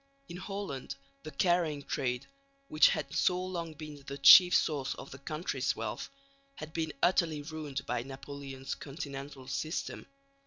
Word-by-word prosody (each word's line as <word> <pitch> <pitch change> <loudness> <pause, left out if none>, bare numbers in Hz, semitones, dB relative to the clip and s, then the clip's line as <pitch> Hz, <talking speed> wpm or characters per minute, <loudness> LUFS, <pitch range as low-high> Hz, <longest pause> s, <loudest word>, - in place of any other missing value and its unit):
In 175 - -6
Holland 190 -9 -5 0.3
the 155 - -7
carrying 160 -2 +1
trade, 125 -2 -2 0.4
which 155 - +6
had 140 -2 -2
so 180 -1 +2
long 170 -4 -4
been 150 -2 -9
the 140 0 -5
chief 175 +6 +9
source 140 -4 +1
of 135 - -10
the 135 - -9
country's 140 -2 -2
wealth, 110 -1 -4 0.5
had 155 +1 -8
been 160 -2 -1
utterly 165 -4 +3
ruined 150 -3 -5
by 125 -1 -1
Napoleon's 135 0 -7
Continental 140 -2 -7
System. 155 +4 -3
145 Hz, 145 wpm, -32 LUFS, 135-160 Hz, 0.5 s, chief